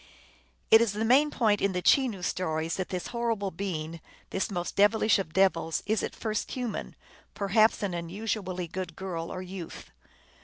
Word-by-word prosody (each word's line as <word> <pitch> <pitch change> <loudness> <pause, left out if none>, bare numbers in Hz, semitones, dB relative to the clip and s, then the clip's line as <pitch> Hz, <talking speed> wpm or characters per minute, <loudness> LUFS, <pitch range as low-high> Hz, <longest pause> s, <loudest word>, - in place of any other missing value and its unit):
It 225 - +9
is 230 -3 +2
the 215 +2 -1
main 275 +6 +5
point 215 -7 +2
in 200 -1 +1
the 180 - -1
Chenoo 245 -10 +3
stories 160 -3 -1
that 185 - -3
this 180 -1 -4
horrible 230 -5 -1
being, 165 -3 -4 0.3
this 195 - -1
most 175 -3 -3
devilish 210 +1 +4
of 185 -5 -4
devils, 170 -3 +2
is 215 +2 +1
at - - -4
first 215 -2 -3
human; 245 -4 -4 0.4
perhaps 215 +2 +3
an 195 -3 -1
unusually 185 +1 -3
good 180 -1 -5
girl, 170 -3 -4
or 185 - -5
youth. 185 -2 -8
195 Hz, 165 wpm, -28 LUFS, 175-220 Hz, 0.4 s, It